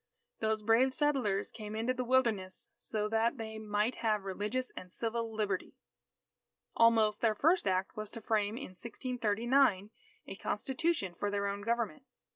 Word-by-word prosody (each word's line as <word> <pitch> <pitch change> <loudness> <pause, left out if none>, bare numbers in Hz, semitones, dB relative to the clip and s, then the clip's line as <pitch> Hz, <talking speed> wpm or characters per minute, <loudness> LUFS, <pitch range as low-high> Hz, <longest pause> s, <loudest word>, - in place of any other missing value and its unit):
Those 220 -1 0
brave 245 +4 +4
settlers 260 -10 +1
came 215 -1 -7
into 230 +3 0
the 255 0 -2
Wilderness 230 -7 0
so 210 -1 -2
that 225 +4 +1
they 220 -1 -6
might 210 +2 0
have 215 -3 0
religious 210 +7 -2
and 180 -1 -10
civil 230 +1 -2
Liberty. 210 -4 -2 1.0
Almost, 225 -2 +4
their 220 -2 +3
first 325 - +3
act 185 0 0
was 215 -1 -5
to 230 - -7
frame 215 0 0
in 280 - -6
1639, 230 0 +1 0.3
a - - -7
Constitution 265 - -1
for 205 +4 -2
their 200 0 -1
own 200 0 -2
government. 235 +5 -1
220 Hz, 150 wpm, -33 LUFS, 205-240 Hz, 1.0 s, brave